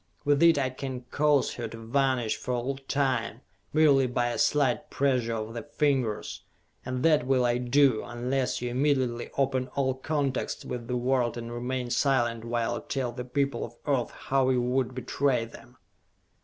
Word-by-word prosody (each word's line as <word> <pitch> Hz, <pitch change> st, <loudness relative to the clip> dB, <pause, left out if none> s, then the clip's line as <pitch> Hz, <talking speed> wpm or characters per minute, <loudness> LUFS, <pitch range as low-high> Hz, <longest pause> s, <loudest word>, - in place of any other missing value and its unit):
With 145 Hz, 0 st, +3 dB
it 170 Hz, -2 st, +6 dB
I 130 Hz, -2 st, 0 dB
can 130 Hz, -1 st, -5 dB
cause 145 Hz, -2 st, +2 dB
her 120 Hz, -2 st, -4 dB
to 115 Hz, -, -9 dB
vanish 120 Hz, 0 st, 0 dB
for 125 Hz, -, -3 dB
all 130 Hz, +3 st, -2 dB
time, 130 Hz, -4 st, 0 dB, 0.3 s
merely 145 Hz, -4 st, +4 dB
by 120 Hz, 0 st, 0 dB
a 120 Hz, -, -3 dB
slight 145 Hz, -3 st, +2 dB
pressure 125 Hz, -4 st, +1 dB
of 110 Hz, 0 st, -4 dB
the 115 Hz, -, -4 dB
fingers! 135 Hz, -6 st, -1 dB, 0.4 s
And 130 Hz, 0 st, -3 dB
that 155 Hz, -6 st, +3 dB
will 130 Hz, -2 st, +3 dB
I 120 Hz, 0 st, +1 dB
do, 125 Hz, -1 st, +3 dB
unless 125 Hz, +1 st, -2 dB
you 120 Hz, -, -2 dB
immediately 130 Hz, -3 st, 0 dB
open 130 Hz, -2 st, +1 dB
all 130 Hz, -2 st, +1 dB
contacts 135 Hz, 0 st, -2 dB
with 120 Hz, -2 st, -5 dB
the 125 Hz, -, -1 dB
world 125 Hz, -1 st, +1 dB
and 120 Hz, 0 st, -6 dB
remain 125 Hz, +1 st, -3 dB
silent 120 Hz, -5 st, +1 dB
while 115 Hz, -1 st, -1 dB
I -, -, -4 dB
tell 130 Hz, -3 st, -3 dB
the 125 Hz, 0 st, -6 dB
people 135 Hz, -1 st, -1 dB
of 120 Hz, -, -8 dB
Earth 135 Hz, -5 st, +1 dB
how 135 Hz, -1 st, 0 dB
you 125 Hz, -1 st, +2 dB
would 125 Hz, 0 st, 0 dB
betray 130 Hz, -1 st, 0 dB
them!" 115 Hz, -, -15 dB
130 Hz, 175 wpm, -28 LUFS, 120-135 Hz, 0.4 s, it